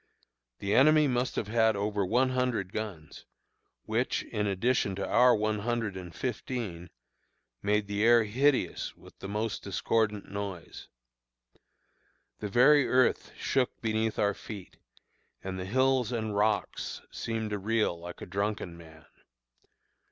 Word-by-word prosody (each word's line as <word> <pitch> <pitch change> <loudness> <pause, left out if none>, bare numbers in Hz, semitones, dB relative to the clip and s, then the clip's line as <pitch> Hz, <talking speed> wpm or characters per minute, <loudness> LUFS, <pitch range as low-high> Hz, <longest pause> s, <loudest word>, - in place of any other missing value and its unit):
The 100 +7 -2
enemy 155 +2 +6
must 125 -1 0
have 105 - -2
had 110 0 +3
over 100 0 -1
one 125 +7 +2
hundred 125 -7 -1
guns, 100 -8 -6 0.6
which, - - 0
in 105 0 -2
addition 100 0 +1
to 100 - -3
our 125 +2 +5
one 105 0 0
hundred 115 -2 -2
and 90 -2 -7
fifteen, 115 -8 -4 0.7
made 105 +1 +1
the 100 +1 -1
air 120 0 +6
hideous 130 +6 0
with - - -17
most 105 +3 -3
discordant 105 +1 0
noise. 100 -4 -6 1.5
The 105 - -4
very 135 +6 +5
earth 130 -1 +2
shook 130 -2 0
beneath 110 -1 -1
our 100 0 +2
feet, 100 -3 -10 0.7
and 95 -1 -4
the 90 - -4
hills 130 +2 +2
and 110 -3 -2
rocks 105 0 -1
seemed 110 -2 -3
to 105 - -2
reel 110 -2 +1
like 85 +1 -9
a - - -5
drunken 100 -3 -3
man. 80 -2 -15
110 Hz, 135 wpm, -29 LUFS, 100-120 Hz, 1.5 s, enemy